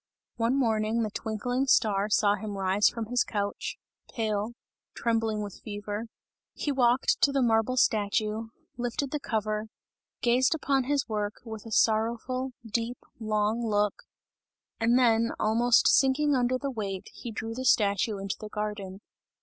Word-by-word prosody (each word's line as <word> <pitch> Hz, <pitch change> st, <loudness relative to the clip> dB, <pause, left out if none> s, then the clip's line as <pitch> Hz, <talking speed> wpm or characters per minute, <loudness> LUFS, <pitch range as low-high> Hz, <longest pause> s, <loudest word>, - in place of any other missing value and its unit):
One 235 Hz, +3 st, +1 dB
morning, 225 Hz, -2 st, +1 dB
the 215 Hz, -, -3 dB
twinkling 245 Hz, +5 st, -2 dB
star 210 Hz, -5 st, +3 dB
saw 205 Hz, -1 st, +4 dB
him 205 Hz, 0 st, -5 dB
rise 195 Hz, +2 st, +3 dB
from 230 Hz, -1 st, -5 dB
his 245 Hz, +2 st, +1 dB
couch 205 Hz, -1 st, -3 dB, 0.3 s
pale 215 Hz, 0 st, -1 dB, 0.4 s
trembling 225 Hz, -2 st, 0 dB
with 200 Hz, -2 st, -8 dB
fever; 205 Hz, +1 st, -5 dB, 0.5 s
he 290 Hz, -, -2 dB
walked 250 Hz, -1 st, +2 dB
to 285 Hz, -, +5 dB
the 275 Hz, -2 st, +2 dB
marble 225 Hz, +2 st, +2 dB
statue, 215 Hz, 0 st, +1 dB, 0.3 s
lifted 245 Hz, +3 st, -2 dB
the 300 Hz, -, -1 dB
cover, 215 Hz, -3 st, -2 dB, 0.6 s
gazed 250 Hz, +5 st, +3 dB
upon 275 Hz, -4 st, +1 dB
his 285 Hz, -1 st, 0 dB
work 210 Hz, -1 st, -2 dB
with 220 Hz, -1 st, -8 dB
a -, -, -9 dB
sorrowful, 235 Hz, +5 st, +1 dB
deep, 230 Hz, +2 st, -2 dB, 0.2 s
long 215 Hz, +1 st, 0 dB
look, 210 Hz, -2 st, +1 dB, 0.9 s
and 235 Hz, +2 st, +3 dB
then 230 Hz, -2 st, +3 dB
almost 230 Hz, +2 st, +4 dB
sinking 280 Hz, +2 st, +4 dB
under 255 Hz, -1 st, +2 dB
the 275 Hz, +1 st, -3 dB
weight, 200 Hz, -5 st, -4 dB
he 235 Hz, -, -7 dB
drew 225 Hz, +1 st, -5 dB
the 255 Hz, +3 st, -5 dB
statue 210 Hz, -2 st, +2 dB
into 195 Hz, 0 st, -4 dB
the 215 Hz, -, -7 dB
garden. 210 Hz, -2 st, -5 dB
225 Hz, 150 wpm, -28 LUFS, 210-245 Hz, 0.9 s, to